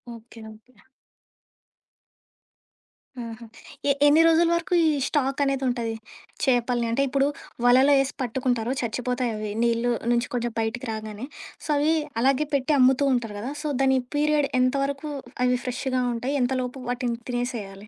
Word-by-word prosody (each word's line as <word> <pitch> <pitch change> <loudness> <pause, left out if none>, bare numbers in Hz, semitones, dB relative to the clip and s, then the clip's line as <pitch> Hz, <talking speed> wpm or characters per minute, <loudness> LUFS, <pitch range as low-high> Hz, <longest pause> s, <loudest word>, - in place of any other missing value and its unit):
Okay. 230 0 -14
Okay. 225 +4 -21 2.5
ఆహా! 230 0 -9 0.4
ఎ - - +6 0.2
ఎన్ని 300 +3 +6
రోజుల 330 +1 +4
వరకు 340 +1 -2
ఈ - - +4 0.2
స్టాక్ 275 -2 0
అనేది 275 -1 0
ఉంటది. 235 -2 -1 0.5
చేపల్ని, 245 -2 +1
అంటే, 235 - +1
ఇప్పుడు 275 +1 +1 0.4
వలలో 260 +4 +6
ఏసి 275 +1 -3
పట్టుకుంటారో, 245 -1 -1
చచ్చిపోతాయి 250 +1 -2
అవి 215 -1 -4
నీళ్ళ 235 +1 +1 0.2
నుంచి 240 +1 +1
కొంచెం 240 -1 -2
బయటికి 225 +3 -2
రాగానే. 215 +1 -6 0.4
సో, - - -9
అవి 300 +3 +2 0.3
అలాగే 275 +4 +2
పెట్టి 280 +2 +1
అమ్ముతూ 265 +2 +4
ఉంటారు 225 -4 -2
గదా! 245 +6 -4
సో, 305 - -2
దాని 265 -1 +4 0.2
పీరియడ్ 295 -1 +2
ఎంత 255 +1 +3
వరకు 280 +2 -3 0.3
అవి 250 0 +3
ఫ్రెష్‌గా 255 0 -1
ఉంటాయి, 250 +5 -2
ఎంతలోపు 255 +1 -2
వాటిని 245 -1 -2
తినేసేయాలి? 220 -5 -4
250 Hz, 140 wpm, -25 LUFS, 235-275 Hz, 2.5 s, ఎ